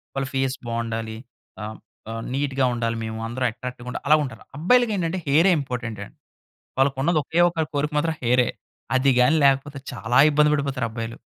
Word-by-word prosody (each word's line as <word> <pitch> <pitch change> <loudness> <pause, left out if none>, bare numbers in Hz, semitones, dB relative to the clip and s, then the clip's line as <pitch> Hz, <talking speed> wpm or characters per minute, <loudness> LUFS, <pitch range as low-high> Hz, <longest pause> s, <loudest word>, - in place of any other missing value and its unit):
వాళ్ళ 135 0 -1
ఫేస్ 135 0 0
బాగుండాలి. 115 -1 -3 0.4
ఆహ్, 110 +1 -6 0.3
ఆహ్, 115 0 -4
నీట్‌గా 135 -1 0
ఉండాలి, 115 -1 -1
మేము 110 0 -5
అందరూ 125 +2 -2
అట్రాక్టివ్‌గా 125 +1 -8
ఉండాలి - - -6
అలా 155 - +8
ఉంటారు. 120 -5 -8
అబ్బాయిలకి 235 +8 +3
ఏంటంటే 180 +1 -1
హెయిర్ఏ 160 +7 +5
ఇంపార్టెంట్ 120 -5 -5
అండి. - - -19 0.6
వాళ్ళకు 135 0 +2
ఉన్నది 165 +2 +2
ఒకే 165 +4 0
ఒక 170 -2 -2
కోరిక 145 +2 -1
మాత్రం 160 +2 0
హెయిర్ఏ. 125 0 +3 0.5
అది 130 +1 +4
గాని 125 +6 +4
లేకపోతే 140 +1 +2
చాలా 120 0 0
ఇబ్బంది 150 0 +4
పడిపోతారు 140 -4 -1
అబ్బాయిలు. 115 0 -5
130 Hz, 170 wpm, -23 LUFS, 115-145 Hz, 0.6 s, అలా